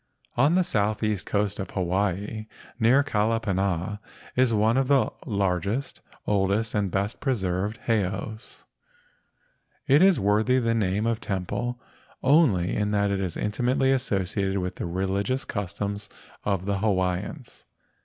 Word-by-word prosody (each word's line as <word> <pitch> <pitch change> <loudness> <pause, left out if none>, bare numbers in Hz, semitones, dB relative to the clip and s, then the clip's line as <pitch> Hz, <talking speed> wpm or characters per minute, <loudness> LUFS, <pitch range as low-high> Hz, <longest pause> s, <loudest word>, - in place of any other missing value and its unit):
On 145 +7 +4
the 185 - +4
southeast 105 - 0
coast 100 0 0
of 95 - -4
Hawaii 100 +3 -1 0.3
near 125 +5 +5
Kalapana 105 -5 0 0.4
is 130 -1 +3
one 110 +2 +3
of 135 0 +2
the 140 -1 +3 0.2
largest, 100 +5 -1 0.2
oldest, 100 +2 +1
and 105 -2 0
best 100 +4 -2
preserved 105 -4 -1
heiaus. 110 0 -2 1.2
It 140 +4 +5
is 190 -1 +5
worthy 105 +6 +3
the 115 -2 +1
name 105 -1 0
of 115 0 0
temple 100 +5 -3 0.4
only 130 - +4
as 105 -1 +1
it 100 - 0
is 90 -4 -3
inti¬ 105 +3 -2
mately 130 +2 +3
associated 100 -5 -1
with 90 0 -2
the - - -3
religious 95 +8 -1
customs 100 +1 -4 0.3
of 95 -3 -1
the 100 -1 0
Hawaiians. 95 - -2
105 Hz, 130 wpm, -26 LUFS, 95-115 Hz, 1.2 s, near